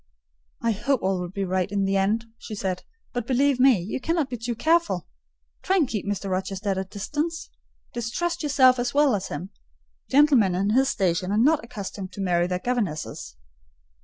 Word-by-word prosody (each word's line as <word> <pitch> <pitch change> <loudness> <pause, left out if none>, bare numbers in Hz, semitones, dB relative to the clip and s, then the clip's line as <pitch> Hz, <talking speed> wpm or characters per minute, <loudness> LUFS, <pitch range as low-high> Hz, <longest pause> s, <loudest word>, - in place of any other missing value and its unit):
"I 230 - +2
hope 250 +4 0
all 190 -1 +1
will 180 -1 -4
be 195 +2 -3
right 185 +1 -1
in 200 -1 0
the 195 0 0
end," 210 +4 +1
she 215 - -7
said: 185 -2 -2 0.3
"but 245 -2 -3
believe 270 0 +2
me, 255 -5 +6
you 195 +9 -4
cannot 325 -4 0
be 245 - -3
too 235 +1 -3
careful. 335 +7 +1 0.5
Try 380 - +1
and 330 -8 +3
keep 210 -4 -4
Mr. 200 -1 -2
Rochester 190 +2 -2
at 195 - 0
a - - -1
distance: 295 - -4 0.4
distrust 335 +10 -2
yourself 265 -4 +4
as 245 +2 -2
well 290 -3 +4
as 195 -2 -2
him. 175 +7 -6 0.6
Gentlemen 265 -10 +5
in 195 +3 +1
his 265 +4 +3
station 185 -2 0
are 205 - +1
not 290 +5 +3
accustomed 200 -4 -7
to - - -10
marry 175 -2 +1
their 180 0 -1
governesses." 185 - -3
215 Hz, 190 wpm, -25 LUFS, 190-270 Hz, 0.6 s, me